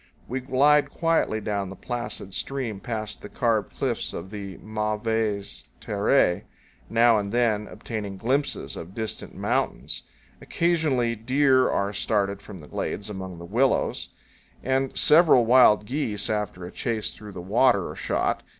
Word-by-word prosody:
127 - - -10 0.2
We 130 - -1
glide 150 +2 +5
quietly 165 -9 +1
down 100 -2 -2
the 95 - -8
placid 110 -6 -5
stream 125 -4 -3
past 110 -1 -5
the 105 - -9
carved 115 -5 0
cliffs - - -1
of 95 +3 -7
the 100 -3 -7
mauvaises 110 -1 -2
terres, 100 -2 +2 0.5
now 115 -1 +5
and 100 -1 -4
then 110 -3 +1
obtaining 105 -3 -6
glimpses 135 +8 -1
of 85 +4 -9
distant 110 -1 -5
mountains. - - -1 0.4
Occasionally, 155 -9 +1
deer 130 +3 +3
are 100 +1 0
started 100 -1 0
from 95 -5 -10
the 75 - -13
glades 100 +7 -4
among 95 -3 -6
the 85 - -9
willows; 125 +8 +1 0.5
and 130 +1 0
several 150 -6 +6
wild 120 -3 +6
geese, 110 -6 -2
after 105 -4 -3
a 90 - -8
chase 115 -2 -2
through 105 -2 -11
the 90 - -7
water, 100 +2 +3
are - - -7
shot. - - -1
110 Hz, 150 wpm, -25 LUFS, 100-125 Hz, 0.5 s, several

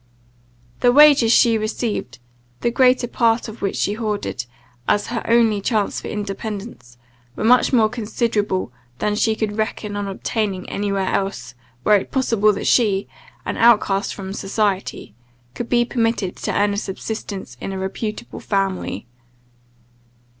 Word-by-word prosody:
The 245 - +4
wages 285 -4 +7
she 230 -2 +5
received, 215 - -3 0.4
the 235 - +1
greater 250 0 +3
part 230 -1 +1
of 220 +1 -10
which 195 - -1
she 205 - 0
hoarded, 210 - -3 0.4
as 205 -1 +2
her 230 - -1
only 230 -3 +3
chance 210 -1 0
for - - -7
independence, 205 - -6 0.4
were - - -4
much 245 +3 +5
more 230 -4 +4
considerable 215 - -1 0.2
than 210 - 0
she 220 +1 +2
could 215 -1 -3
reckon 215 -1 -2
on 205 -1 -3
obtaining 195 -1 -2
any 205 0 -2
where 195 -1 -1
else, 130 -11 -2 0.3
were 210 - +4
it 195 - -5
possible 225 -5 +2
that - - -5
she, 205 -5 +3 0.4
an - - -3
outcast 210 -4 +3
from 195 -1 -6
society, 195 - -2 0.4
could 235 - -5
be 240 -1 +3
permitted 230 -6 -1
to - - -3
earn 205 0 +1
a - - -3
subsistence 195 - -5
in - - -4
a 190 - -4
reputable 210 +4 -5
family. 195 - -2
210 Hz, 145 wpm, -21 LUFS, 195-230 Hz, 0.4 s, wages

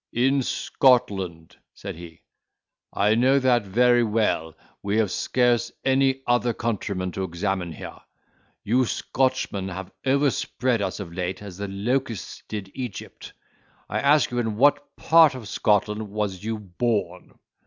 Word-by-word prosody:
"In 135 +3 +2
Scotland," 95 - +1 0.2
said - - -7
he; 85 -1 -12 0.7
"I 105 +2 +2
know 130 +4 +4
that 125 -5 +2
very 120 +4 +4
well—we 105 -2 -2
have 110 -4 +1
scarce 120 -2 +1
any 135 0 +2
other 120 -1 +1
countrymen 100 -5 -2
to 95 - -4
examine 90 0 -2
here—you 120 +8 -5
Scotchmen 130 -9 -1
have 95 0 -7
overspread 130 -3 +1
us 100 - -3
of 90 -4 -7
late 90 +2 -4
as 95 -3 -9
the 100 0 -4
locusts 115 +3 -3
did 100 -3 -6
Egypt. 125 -6 -7 0.6
I - - -2
ask 140 -2 +3
you 120 - -1
in 110 -3 -2
what 145 +3 +2
part 160 -4 +5
of 120 -5 -8
Scotland 105 +1 0
was 100 -2 -3
you 110 0 -2
born?" 100 -2 -3
110 Hz, 130 wpm, -24 LUFS, 95-125 Hz, 0.7 s, part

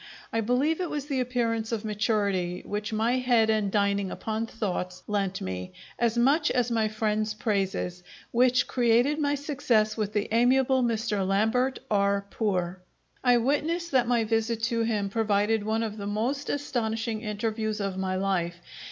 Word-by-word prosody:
I 225 - +1
believe 270 - +1
it 355 - -2
was 295 -2 -3
the 280 -3 -1
appearance 235 -3 -1
of 225 -1 -2
maturity 200 -4 0
which 210 +1 -3
my 230 +4 +1
head 235 -3 +3
and 210 -3 0
dining 200 -1 +1
upon 220 +3 -3
thoughts 185 -5 -4
lent 195 -2 -1
me, 90 0 -5 0.3
as 235 -1 +1
much 285 +6 +3
as 245 -1 +1
my 225 -2 +2
friend's 215 0 -1
praises, 195 -4 -1 0.3
which 250 +1 +3
created 245 +4 +2
my 290 -1 +1
success 260 -7 +1
with 210 -1 -2
the 210 -1 0
amiable 255 +2 +4
Mr. 225 -4 0
Lambert 220 +7 +1
R. 200 -1 +2
Poor. 185 -4 -1 0.4
I 245 -1 +5
witness 310 +8 0
that 255 -5 +2
my 240 -2 +2
visit 225 +1 -1
to 230 -1 +1
him 215 -3 0
provided 215 0 +1
one 220 +2 0
of 220 -1 -4
the 200 -1 -5
most 240 +8 -2
astonishing 225 -5 -2
interviews 215 0 -2
of 195 -2 -2
my 190 0 -2
life. 185 -3 0
220 Hz, 160 wpm, -27 LUFS, 205-245 Hz, 0.4 s, I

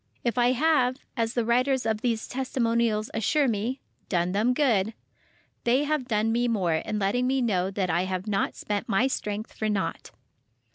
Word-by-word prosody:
If 235 - 0
I 245 0 +3
have, 260 -3 +2 0.2
as 230 -2 -1
the 240 -2 +1
writers 255 +3 +2
of 220 -1 0
these 230 -3 -1
testimonials 235 -4 0
assure 275 +6 +2
me—"done 210 -6 -2
them 220 +6 +2
good,"—they 235 +1 -1
have 295 -4 -1
done 220 -1 +1
me 240 +2 +1
more 190 -8 +1
in 210 +6 -3
letting 210 +5 +1
me 265 +1 +1
know 190 -7 +1
that 190 -2 -1
I 175 +3 +1
have 185 0 -3
not 200 -2 -1
spent 205 +1 -3
my 220 +4 +3
strength 215 -4 -3
for 215 - -2
naught. 190 -6 -2
225 Hz, 170 wpm, -26 LUFS, 205-250 Hz, 0.2 s, I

